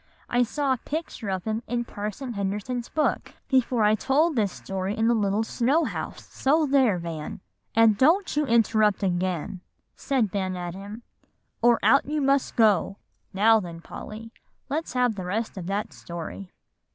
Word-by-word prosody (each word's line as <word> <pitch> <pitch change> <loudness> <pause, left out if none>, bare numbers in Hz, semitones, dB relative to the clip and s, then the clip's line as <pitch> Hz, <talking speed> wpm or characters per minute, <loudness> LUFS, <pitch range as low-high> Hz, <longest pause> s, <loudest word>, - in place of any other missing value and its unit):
"I 245 - +2
saw 270 +3 +1
a - - -2
picture 290 -6 -5
of 190 -2 -2
him 220 +1 -2
in 240 +1 -1
Parson 215 +4 -5
Henderson's 210 +5 -3
book 305 0 -1
before 255 -3 +2
I 210 0 +5
told 295 +8 +2
this 210 -5 +1
story 190 +2 -4
in 225 0 +2
the 240 - +4
little 210 -1 +1
snow 260 +8 +1
house, - - -5
so 305 +4 +2
there, 265 -8 +3
Van!" 165 -3 -6 0.4
"And 220 -2 +5
don't 340 +8 +3
you 300 -1 +1
interrupt 215 -3 +3
again," 180 -1 -1 0.3
said 255 -8 0
Ben 190 -2 -2
at 175 -1 -4
him, 205 +5 -9 0.6
"or 235 0 +5
out 275 +1 +4
you 300 +1 -1
must 275 -1 +1
go. 205 -4 +3 0.3
Now 220 +3 +5
then, 170 -4 -7
Polly, 220 +6 -9 0.4
let's 310 +1 -3
have 250 -2 +2
the 190 -3 -6
rest 220 +5 -2
of 180 -3 -6
that 205 +3 -2
story." 170 +2 -7
220 Hz, 165 wpm, -26 LUFS, 195-260 Hz, 0.6 s, I